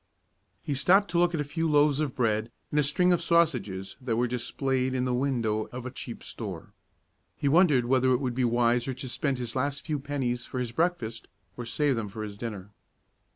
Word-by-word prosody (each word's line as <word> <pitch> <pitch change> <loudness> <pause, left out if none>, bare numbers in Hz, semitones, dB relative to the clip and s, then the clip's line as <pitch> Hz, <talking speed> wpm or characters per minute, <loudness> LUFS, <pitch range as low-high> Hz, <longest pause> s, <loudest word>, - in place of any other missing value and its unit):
He 145 - -2
stopped 190 +9 +4
to 170 - +2
look 175 0 +3
at - - -2
a - - +1
few 165 +3 -2
loaves 145 -1 +4
of 150 -5 -1
bread 110 -2 +1 0.2
and 150 - +2
a - - +4
string 180 +6 +3
of 175 - +1
sausages 130 - +1
that 125 -3 -1
were 120 +2 +2
displayed 130 +2 -1
in 125 0 0
the 125 - 0
window 120 -5 0
of 125 0 -7
a 130 - -4
cheap - - -8
store. - - -7 0.6
He - - -1
wondered 150 -5 +5
whether 130 +1 +3
it 125 -1 +3
would 130 -3 -2
be 130 +1 0
wiser 120 +1 +2
to 130 - -6
spend 135 +2 -1
his 120 -2 -5
last 140 +2 -1
few 150 -3 -1
pennies 135 -4 -2
for 130 - -7
his 125 -2 -2
breakfast, 120 -7 -1 0.3
or 120 -1 -6
save 140 0 +1
them 110 -2 -3
for 110 +2 -6
his 105 -1 -6
dinner. 105 -3 -6
130 Hz, 210 wpm, -28 LUFS, 120-145 Hz, 0.6 s, wondered